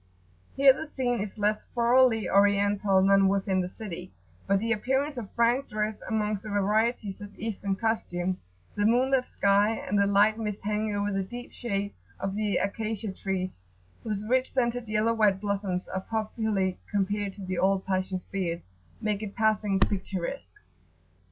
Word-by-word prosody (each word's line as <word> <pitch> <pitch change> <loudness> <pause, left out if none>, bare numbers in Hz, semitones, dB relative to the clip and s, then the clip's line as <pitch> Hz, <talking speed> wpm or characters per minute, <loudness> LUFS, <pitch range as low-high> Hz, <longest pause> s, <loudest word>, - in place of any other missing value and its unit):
Here 270 -1 +7
the 315 +4 -6
scene 245 -6 -1
is 205 +1 -5
less 210 0 0
thoroughly 240 -2 +4
Oriental 200 -1 +3
than 195 0 +5
within 195 -1 +1
the 180 - -3
city; 190 - -7 0.4
but 195 0 +4
the 225 +3 -1
appearance 265 +6 0
of 230 -5 -6
Frank 240 +3 +2
dress 215 0 -1
amongst 210 -2 0
the 215 - -8
varieties 210 +1 0
of 205 0 -10
Eastern 205 -3 -2
costume, 185 -5 -1 0.4
the 205 0 +2
moon 250 +4 +3
lit 260 -2 +3
sky, 200 +2 +3
and 205 -1 -1
the 200 - +4
light 205 +2 +4
mist 210 -2 -2
hanging 210 0 -1
over 205 0 0
the 195 0 0
deep 245 +6 -7
shade 200 -4 -3 0.3
of 195 0 -2
the 210 -1 0
Acacia 215 +1 -2
trees 185 - -3 0.4
whose 210 -2 -3
rich 255 +2 +2
scented 240 -2 0
yellow 215 +2 +2
white 210 -4 +3
blossoms 195 -3 -2
are 190 - -3
popularly 215 -3 -1
compared 205 0 -1
to 195 -1 -8
the 185 -1 -2
old 190 0 +2
Pasha's 185 -1 -2
beard[FN#15] 175 -3 -1 0.4
make 210 -1 0
it 205 -2 -6
passing 215 -3 +2
picturesque. 185 - -2
205 Hz, 165 wpm, -28 LUFS, 195-225 Hz, 0.4 s, Here